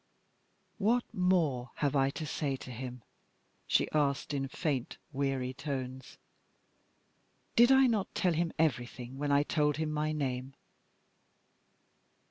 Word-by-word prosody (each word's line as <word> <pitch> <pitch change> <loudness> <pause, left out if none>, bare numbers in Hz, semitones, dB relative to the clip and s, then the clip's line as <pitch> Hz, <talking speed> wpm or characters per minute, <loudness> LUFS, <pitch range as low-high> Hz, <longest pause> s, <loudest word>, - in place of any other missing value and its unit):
"What 230 +4 +3
more 165 -9 +2
have 145 -1 0
I 135 -1 +4
to 155 +3 -5
say 145 -2 -1
to 130 - -9
him?" 125 0 -7 0.6
she - - +3
asked, 145 -1 +1
in 135 -1 -1
faint, 140 -4 -2 0.2
weary 135 -2 -1
tones. 130 -2 -5 1.4
"Did 240 +2 +7
I 265 0 +7
not 220 -6 0
tell 180 -2 +2
him 165 +1 0
everything 125 -3 -1
when 145 0 0
I 140 0 +5
told 150 -1 +1
him 155 -1 -1
my 150 0 0
name?" 135 -3 -3
145 Hz, 125 wpm, -32 LUFS, 130-160 Hz, 1.4 s, Did